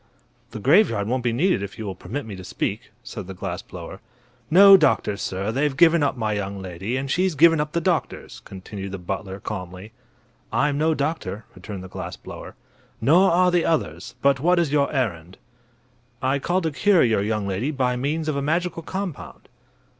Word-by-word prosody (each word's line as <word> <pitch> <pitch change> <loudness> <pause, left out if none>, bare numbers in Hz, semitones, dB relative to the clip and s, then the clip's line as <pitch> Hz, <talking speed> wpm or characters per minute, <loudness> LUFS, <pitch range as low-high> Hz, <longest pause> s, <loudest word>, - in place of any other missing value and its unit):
"The - - -8
graveyard 125 - +3
won't 125 +1 -1
be 120 - +1
needed 150 - +1
if 100 -1 -7
you 110 - -6
will 95 - -4
permit 115 +10 -6
me 105 -3 -7
to 95 - -9
speak," - - -4
said - - -8
the 95 - -8
glass 90 -1 -5
blower. 90 +2 -10 0.5
"No 195 +4 +9
doctors, 135 - +2
sir; 95 +3 -2
they've 135 +2 0
given 170 0 +5
up 145 -2 0
my 110 -2 -1
young 100 -1 -4
lady, 95 +6 -4
and 135 0 -3
she's 185 -1 +1
given 165 +2 +5
up 150 0 -4
the 170 - 0
doctors," 170 -1 -2
continued 95 0 -8
the - - -3
butler, 95 +2 -5
calmly. 95 0 -7 0.6
"I'm 145 0 +1
no 160 +1 +2
doctor," 140 - -3
returned 95 0 -8
the - - -8
glass 90 -1 -7
blower. - - -10 0.4
"Nor 180 +7 +5
are 180 +1 +3
the 175 -1 +2
others. 85 - -2
But 140 -1 +4
what 175 +5 +3
is 170 -5 +1
your 145 -1 +2
errand?" 95 - -3 0.8
"I 130 +2 0
called 180 +6 0
to 160 - 0
cure 195 +5 +3
your 110 -4 +2
young 105 0 -1
lady 100 +8 -2
by 130 -4 0
means 150 +5 -2
of 155 - 0
a 140 - -1
magical 165 +3 -1
compound." 190 -1 -6
130 Hz, 190 wpm, -23 LUFS, 100-160 Hz, 0.8 s, No